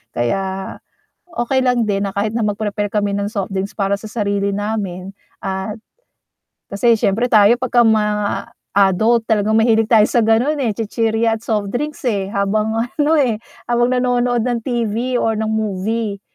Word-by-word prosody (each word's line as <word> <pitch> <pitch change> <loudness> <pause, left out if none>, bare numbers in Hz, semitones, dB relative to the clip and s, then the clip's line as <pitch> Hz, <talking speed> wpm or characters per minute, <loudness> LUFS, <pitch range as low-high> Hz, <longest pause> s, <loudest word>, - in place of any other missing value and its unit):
Kaya 190 +10 -2 0.5
okey 260 -5 -1
lang 245 -3 +2
din 200 -1 0
na 200 - -2
kahit 210 +3 -2
na 235 - 0
mag-prepare 205 -1 -2
kami 205 -1 0
ng 200 +1 -2
softdrinks 195 -2 -3
para 200 0 +1
sa 215 +1 -10
sarili 200 -2 -1
namin 200 -2 -4 0.2
at 190 +2 -4 0.9
kasi 225 +2 +2
siyempre 225 +5 0
tayo 215 +1 +6
pagka 245 -1 +2
ma 210 -2 +1 0.3
adult 210 +4 +3
talagang 215 -1 +1
mahilig 225 -1 +3
tayo 220 -3 +6
sa 235 - +1
ganun, 230 +7 +2
eh, 245 - +1
chichirya 225 +1 0
at - - -27
softdrinks, 240 +8 -3
eh, 200 -5 -1
habang 210 +2 0
ano, 290 +7 +1
eh, 235 -7 +1 0.2
habang 240 0 +1
nanonood 245 -2 +1
ng 245 -2 0
TV 240 +1 -1
or 225 -2 +1
ng 220 0 -2
movie. 215 0 -2
220 Hz, 155 wpm, -18 LUFS, 200-235 Hz, 0.9 s, tayo